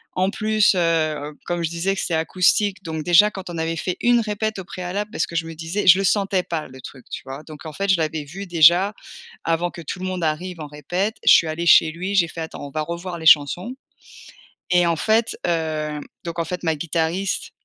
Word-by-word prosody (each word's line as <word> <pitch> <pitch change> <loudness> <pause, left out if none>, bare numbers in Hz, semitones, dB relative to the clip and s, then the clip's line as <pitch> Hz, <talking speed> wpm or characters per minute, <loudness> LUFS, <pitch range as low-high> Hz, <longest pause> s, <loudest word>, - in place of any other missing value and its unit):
En 185 +2 +1
plus, 215 -2 +2
heu, 155 -4 0
comme 175 -1 -2
je 165 - -1
disais 170 +4 -1
que - - -2
c'était 175 - -1
acoustique, 190 +4 +1
donc 160 -2 -4
déjà 180 +5 +5
quand 190 -2 -8
on 170 - -6
avait 165 0 -2
fait 180 +3 -2
1 240 0 +4
répète 215 -1 -2
au 185 - -7
préalable 190 +4 -5
parce - - -1
que 170 - -4
je 165 - -1
me 165 - -7
disais 165 +6 -3
je 185 - +9
le 195 - -1
sentais 195 -1 +1
pas 160 -2 -4
le 130 0 -13
truc, 130 0 -12
tu - - -6
vois? 135 +3 -8
Donc 155 0 -12
en 155 - -6
fait 195 +6 -3
je 190 - +5
l'avais 155 -2 -2
vu 195 +7 -8
déjà, 175 +4 +5 0.5
avant 170 +1 0
que 170 - -9
tout 180 +4 -6
le 185 - -5
monde 185 -2 -3
arrive 170 +3 -3
en 150 - -6
répète, 175 - -3
je - - +7
suis 165 - +6
allée 160 +2 -3
chez 160 - +7
lui, 185 +5 -4
j'ai 170 -3 +4
fait: 165 - -7
«Attends 160 -2 -7
on - - -10
va 155 +2 -3
revoir 170 +2 -5
les 160 - -8
chansons» 165 - +4 1.0
et 175 -1 +4
en 170 - +2
fait, 220 +7 +1
hem 155 -3 -2 0.2
donc 170 0 -5
en - - +1
fait 180 +2 -5
ma 160 -2 +1
guitariste, 170 +4 -2
170 Hz, 235 wpm, -22 LUFS, 160-190 Hz, 1.0 s, je